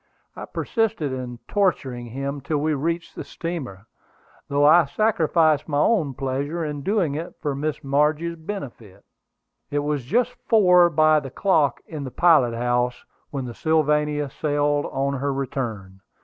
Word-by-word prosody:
I - - -7
persisted 205 - -1
in 125 -2 -5
torturing 135 - 0
him 135 +4 -4
till 150 +3 -1
we 155 +2 0
reached 165 +4 -2
the - - -5
steamer, 135 - -6 0.6
though 145 +1 +2
I 165 +2 +7
sacrificed 160 -4 +2
my 145 -2 -1
own 150 - +2
pleasure 140 +6 -2
in 145 -1 -4
doing 190 -3 0
it 160 +4 -5
for 145 -2 -2
Miss 150 +2 -3
Margie's 150 +4 +1
benefit. 135 - -8 0.6
It 145 - -2
was 145 -2 -1
just 245 - +1
four 180 -6 +6
by 155 -1 +4
the 135 -2 -8
clock 150 -3 +1
in 150 -3 -6
the 130 - -5
pilot 130 -4 +4
house 120 +1 -1 0.2
when 135 -3 -4
the 120 - -6
Sylvania 150 -1 +1
sailed 145 -1 0
on 140 0 -2
her 140 +1 -1
return. 115 -8 -4
145 Hz, 150 wpm, -23 LUFS, 135-165 Hz, 0.6 s, I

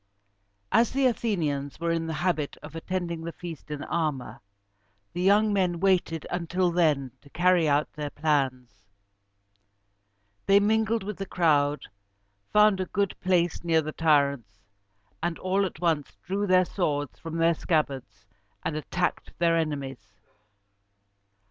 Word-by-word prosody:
As 230 +2 +3
the 270 0 +2
Athenians 160 - -1
were 170 0 0
in 165 -1 -1
the 160 - -3
habit 160 -6 -1
of 155 +2 -10
attending 170 0 -3
the 165 +1 -5
feast 165 -3 -9
in 150 -1 -5
armor, 155 -6 -3 0.7
the 175 - -3
young 205 +3 +4
men 180 -3 +1
waited 175 -4 +1
until 180 +1 0
then 150 -7 +1
to 140 - -18
carry 175 0 +3
out 145 +1 +1
their 150 -1 -4
plans. 130 -9 -1 1.6
They 195 0 +6
mingled 220 +1 +1
with 210 0 -5
the 195 - -5
crowd, 145 -4 +2 0.7
found 210 -2 +5
a 185 - -2
good 200 0 0
place 175 -3 +1
near 165 -2 +2
the 155 - -4
tyrants, 140 -10 +1 0.6
and 175 -1 -2
all 190 +2 +1
at 170 - -11
once 160 -4 -1
drew 200 +3 -1
their 185 0 +5
swords 145 -7 -2
from 165 0 -6
their 165 +1 +4
scabbards 135 - -2 0.4
and 160 - -1
attacked 180 +4 -3
their 170 -1 +3
enemies. 135 - -4
165 Hz, 140 wpm, -27 LUFS, 145-185 Hz, 1.6 s, They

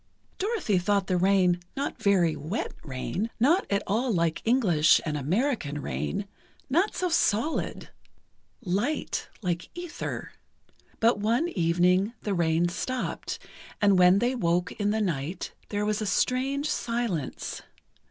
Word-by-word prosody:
Dorothy 385 - +1
thought 200 +2 +1
the 185 - 0
rain 180 -1 +3 0.2
not 280 - -3
very 180 -5 +3
wet 170 +10 -3
rain—not 225 - 0
at 200 0 +1
all 235 +5 0
like 170 -4 0
English 195 -11 +4
and 155 -2 -1
American 160 - -1
rain—not 210 - -3
so 365 - 0
solid—light, 245 - -2 0.2
like 175 -2 -2
ether. 350 -3 -5 0.7
But 230 -1 +3
one 235 +11 +1
evening, 180 - +2
the 205 - -1
rain 170 -1 +2
stopped, 255 +8 -3 0.4
and 200 -3 +4
when 180 +1 +7
they 240 +5 +1
woke 175 -6 0
in 205 -1 -1
the 220 +1 +1
night, 170 -2 -3 0.2
there 205 0 -1
was 210 0 0
a 215 - -1
strange 270 +7 +1
silence. 230 - -2
200 Hz, 125 wpm, -27 LUFS, 175-240 Hz, 0.7 s, when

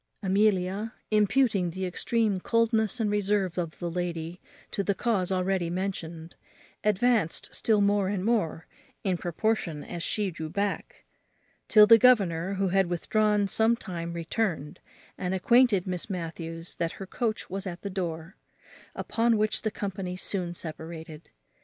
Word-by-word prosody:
Amelia, 195 +1 +1 0.2
imputing 210 -3 +3
the 185 +3 -4
extreme 210 +2 0
coldness 230 +2 +1
and 215 -2 +1
reserve 200 -3 0
of 165 -3 -4
the 175 - -4
lady 170 0 -4 0.3
to 200 - -1
the 200 +1 0
cause 195 -6 0
already 185 -2 0
mentioned, 170 -3 -4 0.5
advanced 210 -3 +1
still 215 -2 +2
more 200 -1 +3
and 195 -1 -2
more 205 -8 0 0.4
in 190 -2 +1
proportion 175 -2 -1
as 175 - -6
she 205 +2 0
drew 160 -1 -6
back; 200 +4 -3 0.6
till 215 -1 +8
the 225 +1 +8
governor, 195 -7 +4
who 195 0 0
had 190 0 +3
withdrawn 210 +3 +1
some 220 +3 +3
time, 170 -6 -5
returned, 165 -3 -2 0.4
and 185 0 -1
acquainted 235 -1 +4
Miss 180 +1 -4
Matthews 165 -2 -5
that 165 -1 -1
her 195 - -7
coach 220 +2 -2
was 195 +1 -4
at 175 -1 -7
the 200 - -4
door; 170 -1 -4 0.6
upon 230 0 +1
which 215 0 0
the 220 - 0
company 190 -3 -4
soon 180 -2 -2
separated. 160 -1 -7
190 Hz, 145 wpm, -28 LUFS, 175-210 Hz, 0.6 s, till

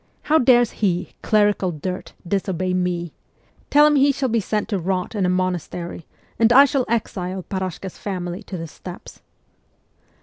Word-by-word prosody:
How 315 +1 +3
dares 245 -3 +4
he, 180 -3 +1
clerical 205 -3 +2
dirt, 180 +4 -5
disobey 185 -1 -1
me? 180 -2 -1 0.6
Tell 295 +1 +6
him 300 -1 +4
he 280 +1 +5
shall 270 -1 -1
be 230 0 +2
sent 210 +1 -2
to 200 -4 0
rot 180 +3 -2
in 200 -4 0
a - - +1
monastery, 180 -2 -3 0.3
and 225 0 +5
I 275 +4 +9
shall 270 -2 0
exile 190 -5 -2
Parashka's 190 -1 -5
family 180 -1 -4
to 185 - -6
the 165 - -5
steppes.' 175 +3 -11
190 Hz, 160 wpm, -22 LUFS, 180-230 Hz, 0.6 s, I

